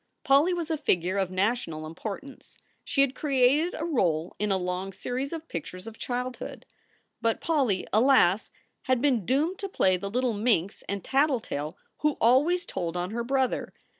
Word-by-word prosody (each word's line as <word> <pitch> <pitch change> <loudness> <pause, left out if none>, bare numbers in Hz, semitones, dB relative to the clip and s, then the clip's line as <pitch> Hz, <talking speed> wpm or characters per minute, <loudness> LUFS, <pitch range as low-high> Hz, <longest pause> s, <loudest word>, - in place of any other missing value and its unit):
Polly 280 +6 +4
was 340 -2 -2
a 320 - +1
figure 185 - +1
of 190 -2 0
national 185 -5 -1
importance. 205 - -8 0.3
She 295 -4 +1
had 275 -2 +3
created 280 +4 +2
a 320 - -3
role 175 - 0
in 210 0 0
a 190 - +3
long 180 +1 -3
series 255 +7 -3
of 325 -1 -6
pictures 180 +3 -6
of 225 0 -10
childhood. 250 0 -4 0.6
But 230 -1 +1
Polly, 270 - +1
alas! 220 -4 +4 0.4
had 255 -1 +2
been 250 -8 +1
doomed 310 +8 +1
to 395 - -4
play 185 - +2
the 200 +2 -5
little 250 +2 0
minx 205 -4 +1
and 200 -1 -3
tattletale 250 - 0 0.2
who 300 -1 +1
always 295 +10 +4
told 175 -2 -3
on 180 +2 -2
her 235 +1 -2
brother. 265 +1 0
240 Hz, 165 wpm, -27 LUFS, 190-275 Hz, 0.6 s, Polly